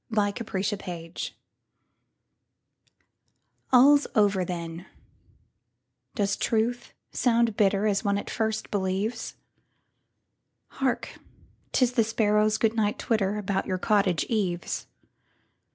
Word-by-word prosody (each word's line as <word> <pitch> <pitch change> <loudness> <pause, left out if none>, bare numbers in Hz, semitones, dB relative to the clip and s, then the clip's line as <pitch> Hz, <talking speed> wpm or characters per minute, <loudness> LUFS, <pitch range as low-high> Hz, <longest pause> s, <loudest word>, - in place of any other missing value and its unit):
The 225 - -5
Lost 205 +2 -2
Mistress 185 -4 -4 2.4
ALL'S 280 +3 +6
over, 200 -3 +3
then: 170 0 -6 1.3
does 200 -5 +1
truth 235 +2 -1 0.2
sound 235 -3 +2
bitterAs 200 0 +2
one 200 -1 +1
at 205 - -5
first 220 -1 -2
believes? 200 +4 -2 1.3
Hark, 265 -2 -2 0.5
'tis 250 -2 +2
the 240 -2 +3
sparrows' 215 -1 +2
good 225 -1 +2
night 210 -2 0
twitterAbout 205 -3 -1
your 185 - -1
cottage 195 -3 +2
eaves! 185 -6 -2
210 Hz, 90 wpm, -26 LUFS, 195-225 Hz, 2.4 s, ALL'S